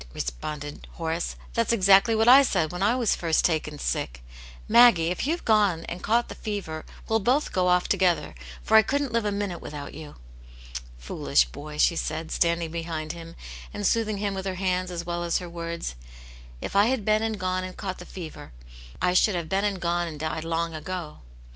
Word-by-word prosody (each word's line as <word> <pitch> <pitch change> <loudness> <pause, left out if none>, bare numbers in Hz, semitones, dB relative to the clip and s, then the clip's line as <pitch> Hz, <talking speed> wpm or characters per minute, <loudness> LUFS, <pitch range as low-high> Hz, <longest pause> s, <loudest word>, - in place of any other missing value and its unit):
" - - -19
responded 145 - -5
Horace. 165 0 -3
" - - -20
That's 230 0 +1
exactly 200 +1 +5
what 220 +1 +2
I 260 +3 +10
said 180 - +1
when 180 +1 -5
I 210 +5 +3
was 240 -5 +2
first 165 -2 +1
taken 155 -3 0
sick. - - -3 0.4
Maggie, 230 -8 +6
if 180 +9 -2
you've 335 +3 -1
gone 205 -7 +3
and 175 +1 -6
caught 235 +2 +2
the - - -7
fever, 195 -8 -5 0.2
we'll 225 0 +2
both 255 +8 +1
go 180 -1 +1
off 180 0 +3
together, 185 -3 +1 0.3
for 220 - +2
I 220 - +10
couldn't 280 +2 -1
live 230 -2 +1
a 205 - +1
minute 200 -4 -3
without 145 -1 -7
you." 150 0 -10 0.8
"Foolish - - +1
boy!" 150 - -9
she 170 - +4
said, 160 0 -3
standing 170 -1 +1
behind 165 -2 -4
him 165 0 -10 0.4
and 205 - -3
soothing 215 0 +1
him 200 0 -1
with 190 0 -4
her 190 - -2
hands 185 -1 -1
as 170 -1 -5
well 175 0 -2
as 170 -1 +1
her 180 - -5
words; 170 - -5 0.7
"if - - -5
I 200 +2 +5
had 245 -5 0
been 215 0 +3
and 220 -2 -2
gone 185 0 -1
and 185 0 -7
caught 190 -3 -5
the 175 - -9
fever, 165 - -9 0.5
I 180 - +3
should 190 +2 +4
have 170 -2 -3
been 195 +3 +1
and 200 -2 -1
gone 175 0 0
and 155 -3 -7
died 155 0 -3
long 165 0 -1
ago." 160 -1 -6
180 Hz, 205 wpm, -26 LUFS, 165-205 Hz, 0.8 s, I